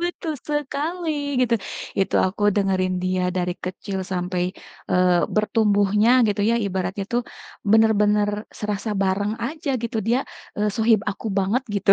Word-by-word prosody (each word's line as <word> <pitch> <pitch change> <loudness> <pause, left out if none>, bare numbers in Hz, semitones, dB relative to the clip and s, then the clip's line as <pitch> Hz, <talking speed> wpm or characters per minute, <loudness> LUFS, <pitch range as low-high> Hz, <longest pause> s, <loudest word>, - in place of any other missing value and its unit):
Betul 345 -2 -2
sekali 300 +4 -2 0.3
gitu, 240 -2 +3 0.5
itu 195 - 0
aku 195 +2 -4
dengerin 190 -2 +1
dia 185 0 0
dari 180 0 0
kecil 190 +1 -4
sampai, 180 0 -1 0.5
eee, 180 -1 +4
bertumbuhnya 210 0 +3 0.2
gitu 205 0 0
ya, 235 - +3
ibaratnya 190 +1 -2
tuh 240 0 +2 0.5
bener-bener 210 -2 +4 0.3
serasa 210 +1 -3
bareng 200 +2 0
aja 305 0 -4
gitu 235 0 -3
dia, 240 +3 +3 0.4
eee, 210 0 +1
sohib 225 -1 +4
aku 205 - -7
banget 200 +7 +1
gitu. 200 0 +2
205 Hz, 135 wpm, -23 LUFS, 190-235 Hz, 0.5 s, eee